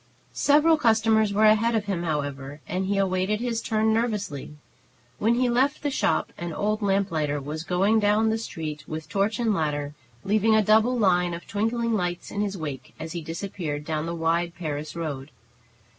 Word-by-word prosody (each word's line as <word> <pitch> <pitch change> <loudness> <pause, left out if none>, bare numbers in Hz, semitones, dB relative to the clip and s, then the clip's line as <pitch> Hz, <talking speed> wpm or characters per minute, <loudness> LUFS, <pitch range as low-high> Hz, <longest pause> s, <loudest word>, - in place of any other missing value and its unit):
Several 305 +3 +4
customers 220 -4 +3
were 210 +2 +3
ahead 220 +2 +4
of 215 -2 0
him, 195 -4 -2
however, 145 -3 -3
and 185 +1 -2
he 200 0 0
awaited 190 +2 +1
his 235 -1 -2
turn 220 0 +1
nervously. 210 - -2 0.6
When 230 +3 +3
he 250 +1 +2
left 265 +5 +1
the 290 - 0
shop - - 0
an 175 -1 -4
old 215 +5 -1
lamplighter 190 -8 0
was 150 +3 -5
going 195 +6 +2
down 215 +1 +3
the 225 - -1
street 155 -8 -6
with 155 0 -6
torch 200 +2 0
and 230 -3 +1
ladder, 150 -4 -2 0.3
leaving 215 +2 +3
a 215 - +4
double 220 +4 +4
line 180 -5 +2
of 170 - -10
twinkling 230 +3 -1
lights 175 -4 -2
in 205 - -2
his 200 -1 -2
wake, 145 -5 -6
as 160 0 -6
he 170 0 -4
disappeared 165 -2 -5
down 155 0 -2
the 170 - -3
wide 170 +1 0
"Paris 155 -3 -5
road." 150 -4 -4
195 Hz, 180 wpm, -25 LUFS, 160-220 Hz, 0.6 s, Several